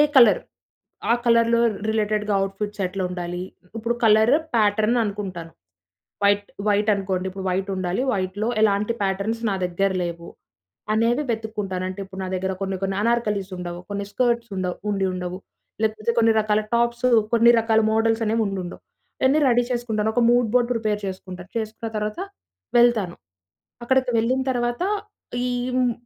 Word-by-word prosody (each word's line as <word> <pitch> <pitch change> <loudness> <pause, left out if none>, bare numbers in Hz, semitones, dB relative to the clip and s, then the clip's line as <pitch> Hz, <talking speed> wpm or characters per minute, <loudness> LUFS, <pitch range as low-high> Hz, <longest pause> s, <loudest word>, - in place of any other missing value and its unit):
Colour? 235 -5 +7 0.7
ఆ - - +6
కలర్‌లో 230 0 +4 0.3
రిలేటెడ్‌గా 210 -1 0
అవుట్‌ఫిట్స్ 205 +1 -3
ఎట్లుండాలి? 180 -1 -3 0.3
ఇప్పుడు 230 +2 -1
కలర్ 220 +3 +5 0.2
ప్యాటర్న్ 215 +2 +3
అనుకుంటాను. 190 -5 -5 0.7
వైట్, 205 0 +3 0.2
వైట్ 210 +1 +3
అనుకోండి. 190 -2 -2
ఇప్పుడు 190 0 -7
వైట్ 190 +2 -1
ఉండాలి, 185 +5 -1
వైట్‌లో 195 +2 -2
ఎలాంటి 210 +1 +2
ప్యాటర్న్‌స్ 200 +4 -1
నా - - 0
దగ్గర 180 +2 0
లేవు? 170 0 -6 0.6
అనేవి 230 +5 +2
వెతుక్కుంటాను 210 -5 -3
అంటే 185 +2 -6
ఇప్పుడు 190 0 -9
నా - - -4
దగ్గర 190 +1 -1
కొన్ని 195 0 -2
కొన్ని 195 0 -1
అనార్కలిస్ 210 -4 0
ఉండవు, 175 -1 -6
కొన్ని 200 0 -3
స్కర్ట్స్ 235 0 0
ఉండవు, 180 -1 -2
ఉండి 195 -1 0
ఉండవు. 180 0 -4 0.4
లేకపోతే 215 +1 0
కొన్ని 225 -1 +5
రకాల 215 0 +1
టాప్స్, 235 +1 +1 0.3
కొన్ని 235 0 +6
రకాల 225 -1 +3
మోడల్స్ 225 +1 +2
అనేవి 225 +1 +1
ఉండి 195 -1 -3
ఉండవు. 175 - -9 0.4
ఇయన్నీ 270 +4 +4
రెడీ 245 0 +4
చేసుకుంటాను 220 -3 0
ఒక 245 - +3
మూడ్ 240 -1 +3
బోర్డ్ 245 -1 +3
ప్రిపేర్చే 210 -4 -1
సుకుంటా. 180 -1 -9
చేసుకున్న 225 0 -3
తర్వాత 210 +6 -3 0.6
వెళ్తాను 225 -7 +3 0.7
అక్కడికి 260 +1 +2
వెళ్ళిన 250 +4 +1
తర్వాత 240 +3 -1 0.6
ఈ - - 0 0.3
హ్మ్. 250 -1 +2
210 Hz, 145 wpm, -23 LUFS, 195-230 Hz, 0.7 s, కలర్